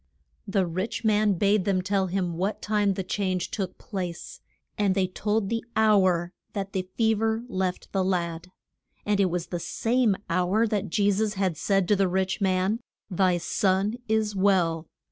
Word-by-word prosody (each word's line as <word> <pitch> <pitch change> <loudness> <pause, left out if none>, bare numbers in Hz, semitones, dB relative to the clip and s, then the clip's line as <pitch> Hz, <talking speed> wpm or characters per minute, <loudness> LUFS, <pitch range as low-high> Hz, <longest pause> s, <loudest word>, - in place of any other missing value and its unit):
The 195 -1 +1
rich 185 +7 -3
man 210 -1 +3
bade 200 +2 +2
them 185 -1 +1
tell 190 0 +1
him 180 -1 -1
what 190 +5 -1
time 205 -2 +1
the 190 - -2
change 185 -1 -2
took 190 -4 -4
place, 180 -5 -6 0.3
and 200 -3 +1
they 190 -2 +2
told 210 +3 -1
the 230 +2 -2
hour 185 -5 +3 0.2
that 195 -1 -4
the 185 -1 -3
fe 225 -1 +3
ver 225 +1 0
left 185 -5 -3
the 195 -1 +1
lad. 170 -2 -1 0.6
And 205 -1 +1
it 190 -2 +3
was 175 0 -2
the 175 - -3
same 230 +3 +1
hour 185 +6 +2
that 210 -2 -1
Je 205 +3 +2
sus 210 +1 0
had 190 -3 0
said 195 +3 +1
to 210 - +4
the 195 -1 +2
rich 190 +2 -1
man, 190 +3 +1 0.3
Thy 185 -1 +2
son 190 +3 +1 0.2
is 220 -2 +1
well. 175 -5 +2
195 Hz, 175 wpm, -26 LUFS, 185-210 Hz, 0.6 s, to